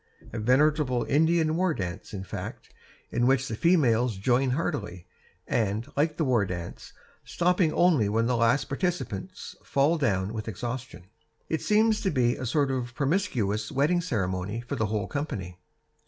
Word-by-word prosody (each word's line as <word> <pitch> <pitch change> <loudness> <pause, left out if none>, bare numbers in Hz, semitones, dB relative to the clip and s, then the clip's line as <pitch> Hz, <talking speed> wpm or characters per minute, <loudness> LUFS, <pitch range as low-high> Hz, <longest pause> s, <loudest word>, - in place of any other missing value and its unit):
A 115 - -3
veritable 130 +1 +2
Indian 160 +2 +2
war 180 -2 +1
dance, 95 +1 -5
in 95 -2 -5
fact, 95 - -7 0.4
in 120 - +1
which 135 0 +2
the 110 - -3
females 125 - +3
join 125 +6 +2
heartily, 105 - -3 0.4
and 110 0 0
like 150 +2 +1
the 160 - +1
war 120 -5 +3
dance, 85 -3 -6 0.3
stopping 180 -1 +1
only 155 - +3
when 115 +2 +1
the 125 +1 +1
last 120 +4 +2
participant 180 +5 -2 0.3
falls 150 +4 +1
down 100 -5 0
with 110 -1 -5
exhaustion. 120 -1 -6 0.4
It 160 - -1
seems 215 +1 +3
to 195 - +1
be 125 -6 +2
a 130 - -5
sort 140 +2 +1
of 125 -2 -3
promiscuous 125 - 0
wedding 150 +6 +2
ceremony 100 - -2
for 120 - -5
the 110 - 0
whole 105 -2 -1
company. 100 - -5
125 Hz, 155 wpm, -27 LUFS, 110-155 Hz, 0.4 s, females